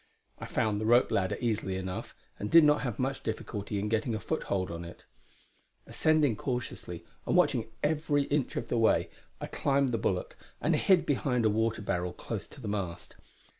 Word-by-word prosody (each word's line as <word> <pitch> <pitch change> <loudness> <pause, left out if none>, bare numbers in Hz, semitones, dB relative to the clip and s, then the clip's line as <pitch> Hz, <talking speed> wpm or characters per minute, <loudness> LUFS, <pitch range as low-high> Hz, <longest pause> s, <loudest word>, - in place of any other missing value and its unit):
I - - -6
found 105 -1 0
the 110 - -1
rope 120 +2 +5
ladder 95 -1 +1
easily 105 -5 -1
enough, 95 -1 -5 0.2
and 105 - -3
did 165 -1 +8
not 150 0 +4
have 120 -6 -3
much 135 +1 -1
difficulty 105 -2 -4
in 100 +1 -1
getting 110 +1 0
a - - -2
foothold 100 - -2
on 85 0 -5
it. 85 +1 -11 0.8
Ascending 155 -7 +2
cautiously, 125 0 -4 0.2
and - - +1
watching 110 -1 +3
every 150 -1 +2
inch 140 -1 -1
of 115 - -3
the 120 - 0
way, 110 - +3 0.3
I - - -4
climbed 140 -2 +1
the 115 - 0
bulwark 90 -3 -1 0.2
and - - +2
hid 185 -3 +4
behind 125 -4 +1
a 110 - +4
water 110 0 0
barrel 90 -3 -1
close - - -5
to - - -14
the 115 - -6
mast. 95 -4 -4
115 Hz, 185 wpm, -30 LUFS, 100-135 Hz, 0.8 s, did